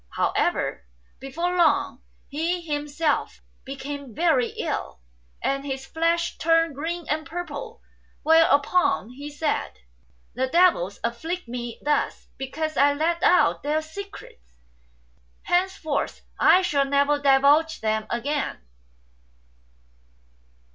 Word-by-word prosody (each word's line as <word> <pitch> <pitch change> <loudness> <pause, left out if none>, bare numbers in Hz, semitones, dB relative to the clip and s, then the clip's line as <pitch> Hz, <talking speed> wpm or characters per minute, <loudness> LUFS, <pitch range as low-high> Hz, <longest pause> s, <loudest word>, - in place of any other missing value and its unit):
However, 65 - 0 0.3
before 335 +7 -2
lorg 290 -6 +2 0.3
he 330 +5 -2
himself 295 -1 -1 0.2
became 275 -2 -7
very 315 -8 +3
ill, 60 - -3 0.4
and 275 0 0
his 270 -1 -4
flesh 335 +3 0
turned 330 -1 +3
green 330 +4 -4
and 310 +1 -1
purple; 355 +8 -7 0.4
whereupon 320 - +3
he 285 +3 -8
said, 295 +1 -2 0.6
"The 260 +3 -1
devils 270 - +3
affiict 315 +9 -3
me 240 -1 -6
thus 295 0 -1
because 310 +3 -3
I 285 0 +5
let 330 +4 0
out 360 - +4
their 305 +2 0
secrets. 315 - -11 0.9
Hence 375 +2 +1
forth 305 -3 -3 0.2
I 370 - +6
shall 285 -6 +2
never 285 +1 +2
divulge 285 +3 +4
them 220 0 -1
again." 285 +5 -2
295 Hz, 105 wpm, -24 LUFS, 270-330 Hz, 0.9 s, I